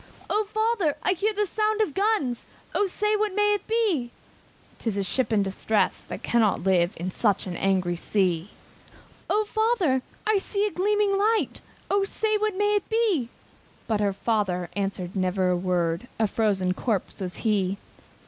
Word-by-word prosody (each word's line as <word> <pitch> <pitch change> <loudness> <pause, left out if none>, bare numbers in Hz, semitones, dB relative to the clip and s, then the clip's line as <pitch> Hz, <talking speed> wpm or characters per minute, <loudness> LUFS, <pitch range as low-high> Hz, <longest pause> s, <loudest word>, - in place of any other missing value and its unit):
"O 425 +1 +2
father! 430 -7 0
I - - +3
hear 405 +4 0
the 420 0 0
sound 430 +2 0
of 420 -9 +1
guns, 385 - 0 0.3
O 410 - +2
say, 420 +3 +1
what 420 -2 0
may 415 0 +3
it 410 - -3
be?" 420 - +1 0.7
"Some 205 -4 -1
ship 240 +7 -1
in 210 -2 +3
distress, 200 +2 0
that - - -7
cannot 225 -7 +2
live 180 -2 +3
In 180 +3 -3
such 205 0 +1
an 180 -2 -5
angry 185 -2 +1
sea!" 180 -1 0 0.8
"O 425 +1 +2
father! 425 - +1 0.2
I 430 -2 +3
see 400 +1 -1
a 420 - -1
gleaming 405 +1 +1
light, 435 +2 +1 0.3
O 400 0 +3
say, 430 +2 0
what 425 -2 -1
may 415 +1 +2
it 410 -2 0
be?" 425 - +1 0.6
But 220 -2 0
the 205 -1 +1
father 195 -4 -1
answered 195 -2 -3
never 185 0 +1
a - - +2
word, 175 +2 -1
A 225 - +2
frozen 195 -4 +1
corpse 205 -1 -2
was 180 -1 -4
he. 200 -3 +1
245 Hz, 165 wpm, -26 LUFS, -, 0.8 s, I